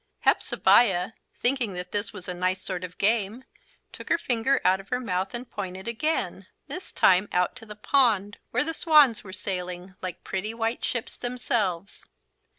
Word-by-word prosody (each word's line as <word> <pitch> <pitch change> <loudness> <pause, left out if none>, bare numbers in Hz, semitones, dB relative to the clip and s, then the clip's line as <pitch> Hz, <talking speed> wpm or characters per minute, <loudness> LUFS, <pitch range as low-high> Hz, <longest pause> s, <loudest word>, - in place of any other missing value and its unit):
Hepzebiah, 190 -6 +4 0.3
thinking 245 -5 +1
that 180 0 -6
this 205 0 -2
was 185 -3 -10
a 180 - -3
nice 185 +1 0
sort 185 -1 -3
of 180 -1 -6
a - - -30
game, 220 +3 +1 0.5
took - - -10
her - - +4
finger 255 -3 +1
out 190 +1 +4
of 195 - -13
her 250 - 0
mouth 190 -2 -2
and 240 +1 -5
pointed 190 -1 -6
again 305 +8 -1 0.2
this 365 - -7
time 185 +2 +4
out 180 +4 0
at 225 - -13
the 210 - -8
pond 210 -4 +2
where 250 - +1
the 325 +2 -3
swans 300 -9 +5
were 190 - -10
sailing, 180 -1 -5
like 185 -1 -6
pretty 210 +4 -3
white 230 +1 -2
ships 235 -2 -3
themselves. 220 -7 -1
205 Hz, 175 wpm, -26 LUFS, 185-245 Hz, 0.5 s, swans